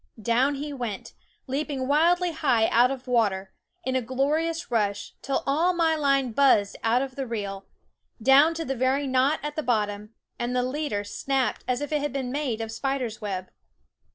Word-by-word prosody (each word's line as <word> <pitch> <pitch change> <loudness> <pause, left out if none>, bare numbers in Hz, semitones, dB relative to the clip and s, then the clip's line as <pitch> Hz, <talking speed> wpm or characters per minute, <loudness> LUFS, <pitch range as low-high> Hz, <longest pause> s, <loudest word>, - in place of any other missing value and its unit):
Down 245 +6 +2
he 290 +1 -5
went, 235 -7 -5 0.3
leaping 275 -1 -2
wildly 345 +5 +3
high 260 -8 +2
out 240 +2 +5
of 270 -1 -5
water, 200 -6 +1 0.3
in 260 -3 -1
a 260 - +2
glorious 300 +7 -1
rush, 205 -3 -1
till 275 - -1
all 320 +6 +2
my 330 -2 +2
line 275 -4 +1
buzzed 220 -5 +3
out 235 +3 +2
of 265 -2 -7
the 270 -2 -4
reel, 200 -4 -5 0.5
down 275 +7 +5
to 325 0 -3
the 270 - -1
very 260 +3 +1
knot 260 +3 +2
at 295 0 -4
the 310 - -1
bottom, 210 -3 -1 0.2
and 240 +1 -2
the 250 - +2
leader 255 -5 -2
snapped 265 +5 -1
as 250 +1 0
if 290 - -4
it 300 -1 +1
had 290 - -2
been 260 -3 -3
made 265 -6 -2
of 225 0 -4
spider's 250 -1 -3
web. 185 -3 -4
260 Hz, 180 wpm, -26 LUFS, 230-290 Hz, 0.5 s, out